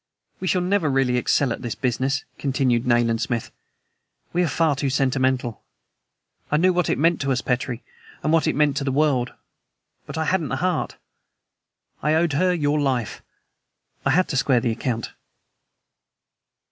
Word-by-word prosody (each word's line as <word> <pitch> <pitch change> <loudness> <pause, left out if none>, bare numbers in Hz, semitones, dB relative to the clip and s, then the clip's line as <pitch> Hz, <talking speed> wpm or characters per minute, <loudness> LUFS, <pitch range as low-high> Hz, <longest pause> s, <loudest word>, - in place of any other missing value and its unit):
"We 185 - -3
shall 180 0 +2
never 185 -4 +1
really 135 -2 +2
excel 125 +1 +2
at - - -8
this 120 - -4
business," 130 +3 -1
continued 130 -3 +1
Nayland 120 -2 +2
Smith. 115 -1 -2 0.8
"We 175 - +2
are - - +1
far 160 -1 +1
too 140 0 -1
sentimental. 130 -3 0 0.9
I 150 - +3
knew 185 +3 +4
what 180 -1 +1
it - - +1
meant 165 +3 +2
to 135 0 0
us, 125 -2 +1
Petrie, 125 -1 -2 0.4
what 160 +1 +2
it - - +1
meant 150 -2 +2
to 145 - -1
the 135 - -1
world, 135 -4 +1 0.7
but - - -6
I 160 - 0
hadn't 170 -3 0
the - - -1
heart. 180 +6 -1 1.1
I 150 +2 +2
owed 165 -1 +2
her 180 +5 +2
your 150 -3 +1
life 130 -6 -1 0.8
I - - +1
had 180 +6 +3
to 135 - -1
square 130 -2 +3
the 120 0 0
account." 115 0 -3
135 Hz, 165 wpm, -23 LUFS, 125-160 Hz, 1.1 s, knew